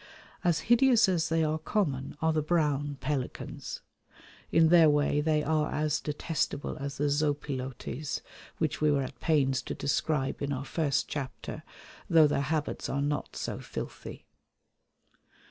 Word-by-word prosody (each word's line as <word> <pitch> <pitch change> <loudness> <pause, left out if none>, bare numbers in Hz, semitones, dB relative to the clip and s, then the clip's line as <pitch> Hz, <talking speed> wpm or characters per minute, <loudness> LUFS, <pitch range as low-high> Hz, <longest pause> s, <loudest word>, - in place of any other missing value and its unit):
As 170 -3 +2
hideous 240 -1 +5
as 175 -4 +1
they 165 0 +2
are 155 0 0
common 145 -6 -1
are 160 0 +3
the 155 - +1
brown 145 -3 0
pelicans. 135 -1 -4 0.7
In 160 -1 +5
their 165 -2 +7
way 145 0 +2
they 155 0 +1
are 155 0 +1
as 155 0 0
detestable 150 -1 -2
as 140 -2 -5
the 145 - -1
zopilotes 145 -1 -2 0.4
which 155 -2 -1
we 150 -1 +4
were 140 -1 +2
at 130 - -8
pains 135 -4 +2
to - - -5
describe 140 -1 -1
in 140 0 -1
our 135 0 -3
first 150 -4 0
chapter, 135 -3 -5 0.5
though 160 -2 +7
their 145 -1 +1
habits 150 +1 -2
are 140 +1 0
not 145 0 -2
so - - -4
filthy. - - -7
150 Hz, 145 wpm, -29 LUFS, 140-160 Hz, 0.7 s, their